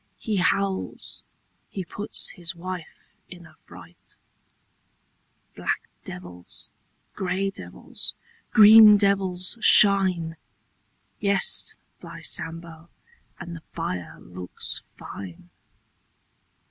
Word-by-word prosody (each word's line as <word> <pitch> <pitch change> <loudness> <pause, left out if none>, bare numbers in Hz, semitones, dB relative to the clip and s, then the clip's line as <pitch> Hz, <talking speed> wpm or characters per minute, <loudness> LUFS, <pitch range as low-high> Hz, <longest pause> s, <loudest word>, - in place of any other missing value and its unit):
He 210 - -3
howls. 195 +1 -1 0.5
He 190 -2 -6
puts 205 +4 0
his 175 -1 -2
wife 180 -1 -9 0.2
in 175 -2 -12
a 155 - -17
fright. 85 0 -14 1.4
Black - - -2 0.2
devils, 90 -1 -10 0.4
grey 190 +1 -2
devils, 90 - -7 0.3
green 215 0 +9
devils 195 0 0
shine 185 -7 +5 0.4
— - - -44
Yes, 200 -1 +2 0.2
by - - -10
Sambo, 165 0 -3 0.5
And 170 -1 -7
the 165 - -10
fire 90 - -5
looks 90 0 -4 0.2
fine! 90 -2 -10
175 Hz, 90 wpm, -24 LUFS, -, 1.4 s, green